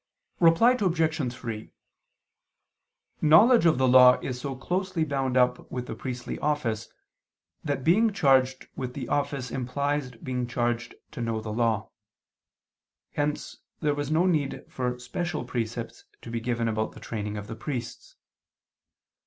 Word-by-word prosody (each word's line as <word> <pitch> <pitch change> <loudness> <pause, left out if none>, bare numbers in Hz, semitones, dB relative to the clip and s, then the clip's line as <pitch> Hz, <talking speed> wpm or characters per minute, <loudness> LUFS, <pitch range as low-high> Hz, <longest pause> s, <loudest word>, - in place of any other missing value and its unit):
Reply 170 +8 +6
Obj. 160 - 0
3: 115 -3 -7 1.5
Knowledge 190 +8 +6
of 160 - +4
the 130 0 +3
Law 125 0 +8
is 125 -2 -4
so 135 0 -4
closely 180 +5 -1
bound 135 -4 -1
up 125 0 +2
with 125 -1 -4
the - - -5
priestly 125 -2 -5
office 125 -8 -1 0.7
that 140 -4 -2
being 215 - +4
charged 130 -7 +3
with 125 -1 -5
the 130 -4 -5
office 140 -4 -1
implies 140 +2 -1
being 125 0 -4
charged 120 0 -2 0.2
to 150 -5 -6
know 115 -1 -1
the 110 -1 -5
Law: 110 -2 0 1.2
hence 145 0 -2 0.2
there 150 -2 +1
was 145 -1 -3
no 160 +3 +3
need 155 -7 0
for 125 -1 -3
special 155 +6 -4
precepts 115 -1 -4 0.2
to 115 - -8
be 115 - -2
given 115 0 -1
about 110 0 -1
the - - -12
training 105 -2 -4
of 105 - -6
the 115 - -7
priests. 125 -2 -6
130 Hz, 145 wpm, -27 LUFS, 120-150 Hz, 1.5 s, Law